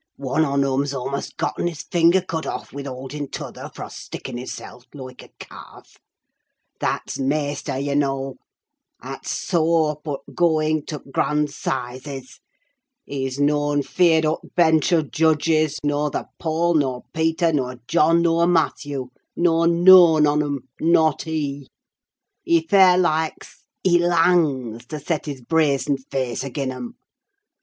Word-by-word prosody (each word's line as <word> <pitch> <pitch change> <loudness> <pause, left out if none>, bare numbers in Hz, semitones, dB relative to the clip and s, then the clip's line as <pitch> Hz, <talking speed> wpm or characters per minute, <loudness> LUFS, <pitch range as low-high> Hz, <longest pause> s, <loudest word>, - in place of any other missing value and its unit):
One 140 +3 0
on 140 -1 +1
'em 135 0 +1
's 140 - -4
a'most 135 +2 -4
getten - - -1
his 165 -3 -5
finger 175 +1 +3
cut 165 -3 -4
off - - -6
wi' 140 0 -6
hauding 135 +2 -6
t' - - -5
other - - -9
fro' - - -8
stickin' - - -8
hisseln 125 0 -8
loike 130 -2 -9
a - - -15
cawlf. - - -13 0.8
That's - - -3
maister, 145 0 -2
yah 140 +1 -2
knaw, 135 -1 -1 0.7
'at - - -8
's - - -3
soa 165 -2 +1
up 150 +1 -13
o' 145 -2 -4
going 155 -3 +1
tuh 150 -3 -6
t' 135 - -15
grand 150 +1 0
'sizes. 130 0 -5 0.7
He's 135 -1 -4
noan 145 0 +1
feared 165 0 +3
o' 155 +1 0
t' - - -15
bench 160 -1 +3
o' 165 -3 +3
judges, 155 0 +1
norther 145 0 -1
Paul, 170 +1 0
nur 130 -5 0
Peter, 160 +1 +1
nur 130 -3 -1
John, 165 +2 +3
nur 170 0 +3
Matthew, 145 -6 0 0.3
nor 165 -1 +2
noan 170 -2 +7
on 150 +1 +2
'em, 145 -2 -2 0.2
not 160 -2 +3
he! 145 -3 -3 0.7
He 165 -1 +2
fair 185 0 +6
likes—he 175 +1 -1
langs 160 -9 +1
to 155 - -6
set 155 +2 -3
his 140 -3 -5
brazened 140 -1 +1
face 130 -3 -2
agean 135 0 -3
'em! 235 - -8
150 Hz, 145 wpm, -22 LUFS, 140-165 Hz, 0.8 s, noan